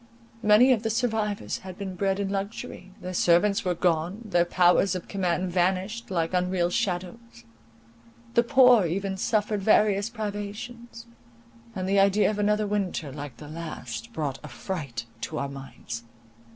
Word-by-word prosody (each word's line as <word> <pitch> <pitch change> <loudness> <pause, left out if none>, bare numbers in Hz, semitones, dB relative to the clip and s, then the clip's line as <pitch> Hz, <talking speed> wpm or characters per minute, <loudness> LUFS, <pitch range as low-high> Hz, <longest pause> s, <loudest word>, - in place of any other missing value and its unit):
Many 215 +4 +6
of 235 -4 +3
the 225 - -1
survivors 220 -3 -1
had 185 -1 -9
been 195 -2 -5
bred 195 +1 0
in 200 -1 -1
luxury—their 195 -2 -6
servants 180 +4 +3
were 180 -1 0
gone, 175 +5 0
their 175 -4 +2
powers 180 +2 +3
of 180 - -5
command 185 -2 -1
vanished 190 +5 0
like 170 -2 -1
unreal 180 -1 +1
shadows: 185 +6 -3 0.9
the 235 - +5
poor 245 -5 +6
even 195 +3 -2
suffered 210 +1 0
various 210 0 +3
privations; 225 +2 -6 0.7
and 185 -1 -3
the 195 +1 +3
idea 200 +2 +4
of 210 - -4
another 210 +1 +2
winter 195 -8 -2
like 145 -1 -8
the 150 - -10
last, 165 +8 -7
brought 145 - -3
affright 140 -4 -5 0.2
to 155 - -4
our 140 - -2
minds. 125 -4 -8
195 Hz, 145 wpm, -26 LUFS, 175-210 Hz, 0.9 s, Many